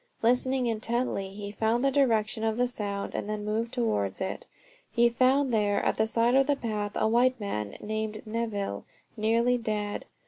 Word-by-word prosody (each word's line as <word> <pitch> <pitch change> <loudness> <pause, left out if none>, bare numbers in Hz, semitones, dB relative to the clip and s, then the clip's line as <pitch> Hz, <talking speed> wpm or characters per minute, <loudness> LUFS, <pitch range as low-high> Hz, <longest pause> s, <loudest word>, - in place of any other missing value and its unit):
Listening 250 +2 +2
intently 230 -3 -1
he 200 +1 -7
found 225 +4 +1
the 275 - +3
direction 225 -6 +2
of 220 0 0
the 250 0 +2
sound, 200 -4 -4
and 205 - -3
then 210 -1 -3
moved 225 +2 -1
towards 165 - -1
it. 190 - -4 0.4
He 235 0 +4
found 255 +2 +2
there, 205 -2 +2
at - - +1
the 220 - +2
side 230 +2 +3
of 270 +1 +4
the 290 - +3
path, 210 -5 -3
a - - +2
white 250 +3 +3
man 105 - -4
named 215 0 -4
Neville, 215 - -3 0.3
nearly 235 +3 +2
dead. 210 -2 -3
220 Hz, 175 wpm, -28 LUFS, 210-245 Hz, 0.4 s, He